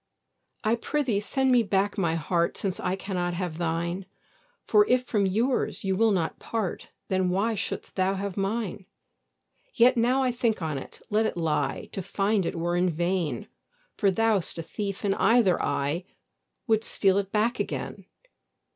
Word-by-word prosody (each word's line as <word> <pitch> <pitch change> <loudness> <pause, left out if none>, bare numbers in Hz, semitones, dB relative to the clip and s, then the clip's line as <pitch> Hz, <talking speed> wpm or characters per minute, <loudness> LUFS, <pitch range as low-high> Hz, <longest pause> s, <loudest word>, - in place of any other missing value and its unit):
I 225 +1 +2
pr'ythee 245 -5 0
send 265 +4 +1
me 245 -1 +6
back 200 -1 +1
my 170 -5 +1
heart, 170 +2 0
Since 190 -3 -2
I 185 - -1
cannot 180 -3 -2
have 175 -3 -4
thine; 170 +2 -2 0.6
For 415 - +5
if 250 0 +3
from 210 -5 +1
yours 230 +7 0
you 190 -1 0
will 225 +3 +4
not 180 -6 0
part, 220 -6 -3 0.2
Why 190 - 0 0.3
then 225 - -1
shouldst - - -4
thou 190 +1 +2
have 195 -1 -4
mine? 200 -1 -2 0.9
Yet 245 +1 +5
now 250 +3 +3
I 255 - +2
think 235 -3 0
on't, 155 -5 -5
let 220 +1 +3
it 175 - -4
lie; 150 -4 -1
To 195 - -4
find 195 0 0
it - - -3
were 175 +1 0
in 180 +1 +2
vain, 175 0 -1 0.5
For 200 - +2
thou'st 210 -3 +1
a 165 - -4
thief 200 +3 -4
in 195 - +3
either 225 -5 +3
eye 145 +5 -1 0.6
Would 220 -3 +2
steal 195 -3 +3
it 195 -1 -4
back 220 +3 +1
again. - - -4
195 Hz, 165 wpm, -27 LUFS, 175-225 Hz, 0.9 s, me